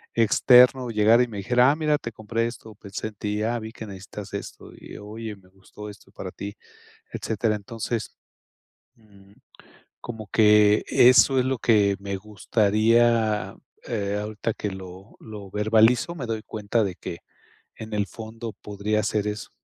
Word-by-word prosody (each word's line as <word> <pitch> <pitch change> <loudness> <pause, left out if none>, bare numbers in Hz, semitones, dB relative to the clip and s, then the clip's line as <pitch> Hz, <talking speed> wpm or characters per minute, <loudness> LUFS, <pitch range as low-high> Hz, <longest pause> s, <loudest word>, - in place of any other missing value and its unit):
externo 125 +3 +5
llegara 110 +3 +5
y - - -2
me 110 -3 -8
dijera: 125 +6 +3
"Ah, - - 0
mira, 155 -2 +1
te 120 - -6
compré 115 +2 -2
esto, 110 -2 -10
pensé 100 +1 -6
en 110 - -11
ti. 105 +1 -3
Ah, 120 +2 -1
vi 110 0 -8
que 110 - -8
necesitas 95 +1 -9
esto. 100 - -8
Y, - - -11
oye, 110 +1 -7
me 95 -1 -22
gustó 95 +2 -12
esto 105 - -15
para - - -7
ti", 100 0 -7 0.6
etcétera. 110 0 -1
Entonces 110 +2 -5 0.8
mm, 100 -3 -21 0.7
como 110 -3 -8
que 105 -1 +5
eso 130 +2 +6
es 125 - +1
lo 130 0 0
que 105 -4 +3
me 100 0 -4
gustaría. 110 +2 +1 0.3
Eh, 100 -3 -2
ahorita 110 +2 -3
que 105 - -4
lo 95 +1 -11
lo 105 -3 -10
verbalizo, 110 - +3
me 135 -7 -5
doy 110 -1 -3
cuenta 110 +1 -1
de 95 -3 -2
que 85 - -7 0.6
en 110 0 -9
el 100 -1 0
fondo 115 0 -8
podría 105 +2 -2
ser 105 0 -1
eso. 105 0 -5
110 Hz, 160 wpm, -24 LUFS, 105-115 Hz, 0.8 s, eso